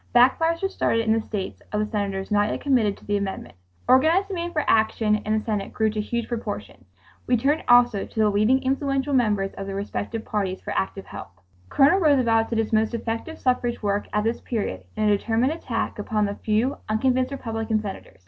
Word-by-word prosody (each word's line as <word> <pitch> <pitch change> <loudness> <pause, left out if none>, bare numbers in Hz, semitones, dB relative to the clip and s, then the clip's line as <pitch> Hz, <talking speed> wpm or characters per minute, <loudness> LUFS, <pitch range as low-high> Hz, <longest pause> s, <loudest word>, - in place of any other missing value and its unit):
Backfires 325 +8 +4
were 390 - +1
started 230 -11 0
in 220 - +3
the 225 - +1
states 205 -3 -5
of 210 - -1
the 215 - +1
senators 200 -2 -3
not 205 0 +3
yet - - -3
committed 240 -8 +2
to - - -18
the 205 0 0
amendment. 200 -1 -5 0.3
Organized 325 +10 +4
demand 345 -2 -3
for 300 - 0
action 220 -1 +3
in 215 +1 -1
the 215 - -4
Senate 210 -3 -2
grew 220 -1 +1
to 215 0 -2
huge 235 +2 -3
proportions. 205 - -6 0.4
We 245 - +3
turned 285 +7 +1
also 245 -4 +4
to - - -7
the 215 -1 +4
leading 215 +6 +2
influential 275 +1 0
members 210 -6 +1
of 195 - -5
the 195 - -4
respective 205 +2 -4
parties 195 -3 -2
for - - -7
active 95 0 -2
help. - - -10 0.3
Colonel 280 - +4
Roosevelt 250 -9 +3
did 230 - -1
his 225 0 -1
most 220 +2 +2
effective 230 +8 -4
suffrage 245 -2 -1
work 205 0 0
at 210 - 0
this 230 +2 -1
period 145 - -3
in 215 - 0
a 210 -1 +4
determined 230 +6 0
attack 240 -10 -3
upon 210 0 0
the 200 - -2
few 220 +6 0
unconvinced 255 +4 +1
Republican 225 -4 -2
Senators. 205 -2 -8
225 Hz, 205 wpm, -24 LUFS, 210-255 Hz, 0.4 s, Backfires